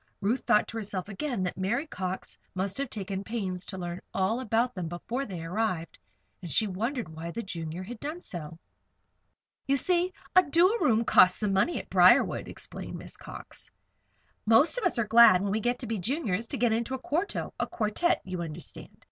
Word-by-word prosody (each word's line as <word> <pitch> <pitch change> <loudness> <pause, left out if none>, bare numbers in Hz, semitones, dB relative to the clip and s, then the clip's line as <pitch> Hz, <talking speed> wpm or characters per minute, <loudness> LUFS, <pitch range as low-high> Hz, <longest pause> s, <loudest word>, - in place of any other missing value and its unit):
Ruth 225 +6 +1
thought 210 - +4
to 230 - -5
herself 200 -3 -4
again 235 0 -2
that 180 +1 -3
Mary 235 +10 0
Cox 185 - -4 0.2
must 190 +6 -2
have 275 -2 -2
taken 195 -2 -4
pains 195 -5 -4
to 190 - -6
learn 175 -1 -5
all 195 +5 +1
about 240 0 +1
them 180 -3 -4
before 235 +11 -4
they 180 -5 -6
arrived, 180 -1 -2 0.4
and 175 -3 -7
she 215 - +3
wondered 225 - -2
why 160 +2 -7
the 230 +7 -4
Junior 165 -1 -5
had 225 +4 -8
done 305 +7 -5
so. 165 - -5 1.1
"You 275 - +3
see, 360 +5 +2 0.2
a 370 - +9
duo 350 +6 +3
room 230 - +3
costs 185 -5 +6
some 210 -2 0
money 200 - +2
at - - -6
Briarwood," - - +5
explained - - -6
Miss - - -8
Cox. - - -9 0.8
"Most 225 +8 +5
of 445 - -3
us 355 - +1
are 230 - +2
glad, 220 -4 +7
when 200 - -1
we 215 - +1
get 245 +2 0
to 250 - -4
be 225 -2 -2
Juniors, 230 - -1
to 275 - -4
get 235 -1 +2
into 235 +3 -1
a - - -6
quarto 335 +10 -2
a - - 0
quartette, 220 +11 0
you 185 -2 -4
understand. 165 0 -8
215 Hz, 195 wpm, -28 LUFS, 185-250 Hz, 1.1 s, a